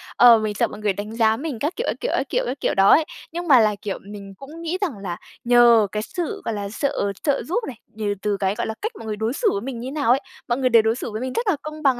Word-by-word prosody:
Ờ, 240 Hz, -2 st, +8 dB
mình 215 Hz, -1 st, -2 dB
sợ -, -, +1 dB
mọi 210 Hz, -, -10 dB
người 210 Hz, -2 st, 0 dB
đánh 205 Hz, +3 st, -6 dB
giá 225 Hz, -1 st, +3 dB
mình 285 Hz, -4 st, -5 dB
các 300 Hz, +8 st, -2 dB
kiểu, 470 Hz, -, -3 dB
các -, -, 0 dB
kiểu, -, -, -2 dB
các -, -, -2 dB
kiểu, -, -, 0 dB
các 275 Hz, -, -4 dB
kiểu -, -, +1 dB
đó 195 Hz, 0 st, +5 dB
ấy. 315 Hz, -, +6 dB, 0.3 s
Nhưng 345 Hz, +1 st, -5 dB
mà 270 Hz, -5 st, +7 dB
là, 215 Hz, -2 st, +3 dB
kiểu, 200 Hz, -2 st, -3 dB
mình 200 Hz, -1 st, -10 dB
cũng 305 Hz, +5 st, -11 dB
nghĩ 335 Hz, +2 st, -2 dB
rằng 320 Hz, -, -2 dB
là 175 Hz, -3 st, -4 dB, 0.3 s
nhờ 240 Hz, -3 st, +6 dB
cái 210 Hz, +2 st, -2 dB
sự, 345 Hz, +6 st, -4 dB
gọi 230 Hz, -, -1 dB
là, 200 Hz, -1 st, -4 dB
sợ 215 Hz, -3 st, -1 dB
trợ 285 Hz, -3 st, +1 dB
giúp 390 Hz, +9 st, -2 dB
này, 245 Hz, -, -7 dB, 0.2 s
nhờ 210 Hz, -1 st, -2 dB
từ 205 Hz, -1 st, 0 dB
cái, 195 Hz, +1 st, 0 dB
gọi -, -, -2 dB
là, 220 Hz, -, -3 dB
cách 435 Hz, -, -2 dB
mọi 225 Hz, -, -9 dB
người 215 Hz, -, -3 dB
đối 220 Hz, +3 st, -2 dB
xử 430 Hz, -, +1 dB
với 200 Hz, -, -2 dB
mình 245 Hz, -1 st, -5 dB
như 250 Hz, -, -6 dB
thế -, -, -5 dB
nào 285 Hz, -5 st, -1 dB
ấy, 265 Hz, -, +4 dB, 0.3 s
mọi 240 Hz, -, 0 dB
người 260 Hz, -1 st, +1 dB
đều 230 Hz, -2 st, +6 dB
đối 225 Hz, +1 st, +1 dB
xử 240 Hz, -, -5 dB
với 215 Hz, -, -4 dB
mình 255 Hz, 0 st, -3 dB
rất 465 Hz, -1 st, -2 dB
là 395 Hz, -, +3 dB
công 305 Hz, 0 st, -8 dB
bằng 260 Hz, -4 st, +3 dB
235 Hz, 315 wpm, -22 LUFS, 210-295 Hz, 0.3 s, Ờ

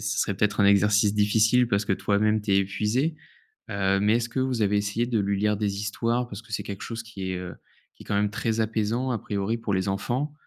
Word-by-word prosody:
serait, 100 Hz, -1 st, -1 dB
peut-être, 105 Hz, +2 st, 0 dB
un -, -, +5 dB
exercice 100 Hz, +1 st, +4 dB
difficile, 110 Hz, +4 st, +3 dB
parce 100 Hz, +1 st, +1 dB
que 100 Hz, -, 0 dB
toi-même, 105 Hz, +2 st, +1 dB
tu 105 Hz, -1 st, -1 dB
es 95 Hz, -, +5 dB
épuisé, 105 Hz, +10 st, 0 dB, 0.5 s
heu, 100 Hz, -1 st, +1 dB
mais, 105 Hz, +3 st, +3 dB
est-ce 120 Hz, 0 st, -2 dB
que 125 Hz, +3 st, -2 dB
vous 130 Hz, -4 st, 0 dB
avez 105 Hz, 0 st, +2 dB
essayé 105 Hz, +4 st, 0 dB
de 120 Hz, -3 st, 0 dB
lui 100 Hz, 0 st, 0 dB
lire 105 Hz, +1 st, +1 dB
des 100 Hz, -1 st, -1 dB
histoires? 115 Hz, +4 st, -1 dB
Parce 100 Hz, -1 st, -8 dB
que 115 Hz, -1 st, -16 dB
c'est 105 Hz, -, -1 dB
quelque 100 Hz, -1 st, -7 dB
chose 115 Hz, -1 st, -5 dB
qui 100 Hz, -5 st, -6 dB
est, -, -, -3 dB
heu, 90 Hz, -1 st, -7 dB, 0.4 s
qui -, -, -14 dB
est -, -, -22 dB
quand -, -, -2 dB
même 100 Hz, 0 st, +1 dB
très 115 Hz, +2 st, -1 dB
apaisant, 110 Hz, +3 st, -1 dB
à 120 Hz, -, 0 dB
priori, 100 Hz, +3 st, -2 dB
pour 110 Hz, -3 st, -2 dB
les 95 Hz, +1 st, 0 dB
enfants. 120 Hz, +9 st, -2 dB
105 Hz, 240 wpm, -26 LUFS, 100-115 Hz, 0.5 s, un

